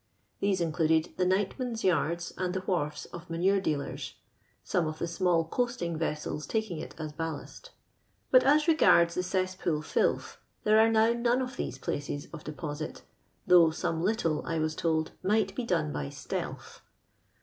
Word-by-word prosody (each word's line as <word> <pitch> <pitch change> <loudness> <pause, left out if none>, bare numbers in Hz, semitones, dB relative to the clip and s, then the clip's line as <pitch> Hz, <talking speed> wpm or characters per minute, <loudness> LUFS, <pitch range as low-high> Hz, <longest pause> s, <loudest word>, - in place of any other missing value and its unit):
These 195 -2 +1
included 160 -1 +2
the 180 -1 +2
nightmen's 220 +5 -1
yards 170 -2 +1
and 180 0 -2
the 185 - -1
wharves 150 -6 -2
of 175 0 -9
manure 190 +4 +2
dealers 150 -6 -3 0.5
(some 170 -3 0
of 155 0 -4
the - - -2
small 170 -1 +1
coasting 205 -4 -1
vessels 150 -2 -3
taking 220 -7 -2
it - - -8
as 155 -2 -5
ballast); 165 - -6 0.6
but 255 -1 +7
as 295 +3 +4
regards 170 - +5
the 180 - 0
cess 185 0 -1
pool 160 -4 -2
filth, - - 0 0.2
there 215 +1 +5
are 225 +1 +6
now 225 +1 +4
none 235 +1 +1
of 255 0 -3
these - - -4
places 145 0 -4
of 155 - -8
deposit, 150 +1 -6 0.4
though 175 -2 +7
some 160 0 -2
litUe, 175 -5 0
I 165 - -2
was 155 0 0
told, 160 -1 0
might 200 0 +1
be 240 +4 -3
done 160 -7 0
by 70 -1 -3
stealth. - - -6
175 Hz, 165 wpm, -29 LUFS, 160-205 Hz, 0.6 s, but